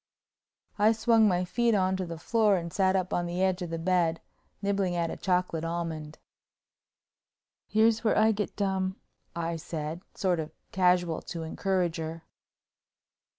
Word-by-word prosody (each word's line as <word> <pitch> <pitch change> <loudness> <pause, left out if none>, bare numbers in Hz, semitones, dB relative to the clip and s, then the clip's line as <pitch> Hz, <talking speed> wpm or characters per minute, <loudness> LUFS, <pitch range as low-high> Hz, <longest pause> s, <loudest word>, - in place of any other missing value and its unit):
I 215 +2 +5
swung 225 0 +4
my 180 -2 +1
feet 235 +4 +1
on 190 -1 +2
to 185 -2 -3
the 165 0 -6
floor 215 +4 +2
and 170 -1 -5
sat 190 -1 +2
up 185 -1 -1
on 175 0 0
the 175 +2 -1
edge 190 -1 +1
of 175 - -4
the 165 - -3
bed, 170 -1 +1 0.4
nibbling 200 -3 0
at 170 -1 0
a - - -4
chocolate 180 -3 0
almond. 165 -2 -4 1.5
"Here's 220 +1 +3
where 220 - +2
I 220 +1 +5
get 210 -1 -3
dumb," 190 -1 -1 0.4
I 170 0 -2
said, 160 0 -5
sort 180 -4 +1
of 155 0 -5 0.2
casual 180 -3 +2
to 165 -1 -4
encourage 180 +1 -1
her. 160 0 -5
180 Hz, 155 wpm, -28 LUFS, 165-195 Hz, 1.5 s, I